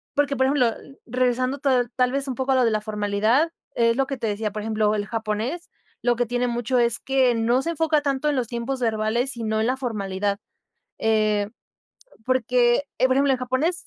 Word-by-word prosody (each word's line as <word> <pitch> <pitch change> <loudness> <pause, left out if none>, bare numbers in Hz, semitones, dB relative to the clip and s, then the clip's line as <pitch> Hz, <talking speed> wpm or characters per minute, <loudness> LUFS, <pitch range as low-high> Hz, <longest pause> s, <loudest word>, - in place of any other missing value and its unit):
Porque, 285 -1 +1
por 260 0 +2
ejemplo, 255 -5 +2 0.3
regresando 255 +2 0
to 275 - 0 0.3
tal 250 -1 +2
vez 275 +1 -2
un 260 - -3
poco 265 +1 -1
a - - +3
lo 255 -1 +4
de 230 - +2
la 215 -1 0
formalidad, 215 +8 +1 0.2
es 230 0 +3
lo 270 - +2
que 275 - -4
te 230 - -3
decía, 210 0 -2
por 215 - -5
ejemplo, 215 -1 +1
el 205 -1 -2
japonés 225 - -3 0.3
lo 240 0 +2
que 245 - +1
tiene 245 +1 0
mucho, 240 +1 -1
es 235 -1 +2
que 260 -2 +2
no 235 +3 +2
se 335 - -1
enfoca 320 -2 +1
tanto 280 0 -1
en 295 - 0
los 250 -3 -1
tiempos 240 +3 -3
verbales, 225 +3 0
sino 220 -2 -2
en 220 - +1
la 255 +1 0
formalidad, 200 -5 -2 0.6
eh, 215 -2 +1 0.8
porque, 250 0 +2 0.2
eh, 260 - +4
por 260 - +2
ejemplo, 275 0 +3
en 260 - 0
japonés. 260 +8 -1
245 Hz, 210 wpm, -23 LUFS, 220-265 Hz, 0.8 s, lo